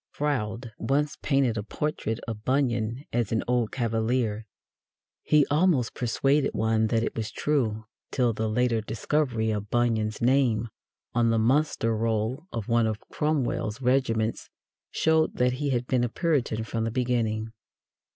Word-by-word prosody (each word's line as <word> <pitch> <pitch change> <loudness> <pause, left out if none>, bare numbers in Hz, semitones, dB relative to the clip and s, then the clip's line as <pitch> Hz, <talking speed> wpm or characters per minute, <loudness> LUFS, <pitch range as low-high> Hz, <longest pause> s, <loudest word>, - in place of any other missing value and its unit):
Froude 120 -5 -2
once 140 +5 0
painted 135 -5 +1
a - - -4
portrait 115 -2 -3
of 110 -2 -5
Bunyan 125 -1 0
as 120 -3 0
an 110 - +1
old 120 -3 +1
Cavalier. 115 -2 -1 0.7
He 150 -2 +4
almost 150 -6 +2
persuaded 135 +4 +1
one 110 0 +2
that 115 +1 +1
it - - -3
was 110 -2 -3
true 115 -7 -1 0.2
till 125 -3 +1
the 110 0 -2
later 120 0 +1
discovery 115 0 0
of 105 -1 -3
Bunyan's 110 -3 +1
name 120 -3 +2 0.4
on 120 -1 +3
the 115 - +2
muster 115 -1 +2
roll 115 +7 -1
of 115 -3 -4
one 115 -1 +3
of 110 -1 -2
Cromwell's 125 -7 -1
regiments 125 -4 0 0.4
showed 160 0 +2
that 125 0 +2
he 140 +2 -2
had 125 -2 0
been 125 -1 +1
a 120 - 0
Puritan 135 -7 0
from 115 0 -3
the 115 - 0
beginning. 115 -2 -1
120 Hz, 150 wpm, -27 LUFS, 110-135 Hz, 0.7 s, He